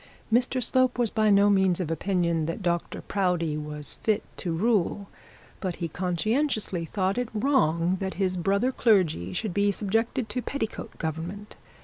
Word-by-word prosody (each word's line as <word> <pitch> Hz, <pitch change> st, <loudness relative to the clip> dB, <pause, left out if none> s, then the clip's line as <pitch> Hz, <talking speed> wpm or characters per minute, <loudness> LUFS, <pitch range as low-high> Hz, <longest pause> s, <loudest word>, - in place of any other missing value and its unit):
Mr 250 Hz, +1 st, +2 dB
Slope 255 Hz, +1 st, +3 dB
was 240 Hz, -3 st, +1 dB
by 215 Hz, -1 st, +2 dB
no 200 Hz, 0 st, +5 dB
means 190 Hz, -3 st, +3 dB
of 180 Hz, -, -1 dB
the 165 Hz, -, -1 dB
opinion 170 Hz, -2 st, 0 dB
that 165 Hz, +4 st, -4 dB
Dr 170 Hz, -1 st, -2 dB
Proudie 180 Hz, -5 st, 0 dB
was 150 Hz, -1 st, -6 dB
fit 215 Hz, -2 st, +1 dB
to 175 Hz, -, -3 dB
rule, 200 Hz, +1 st, 0 dB, 0.5 s
but 185 Hz, -3 st, -3 dB
he 170 Hz, -, -3 dB
conscientiously 185 Hz, -, -1 dB
thought 190 Hz, +5 st, -1 dB
it 245 Hz, -2 st, -2 dB
wrong 185 Hz, -, +2 dB
that 190 Hz, -1 st, -3 dB
his 185 Hz, -1 st, 0 dB
brother 200 Hz, +8 st, +1 dB
clergy 180 Hz, -, +2 dB
should 215 Hz, -, -3 dB
be 205 Hz, +1 st, +2 dB
subjected 225 Hz, +4 st, -1 dB
to 250 Hz, +4 st, -2 dB
petticoat 235 Hz, -4 st, -5 dB
government. 170 Hz, +6 st, -5 dB
195 Hz, 160 wpm, -27 LUFS, 170-220 Hz, 0.5 s, no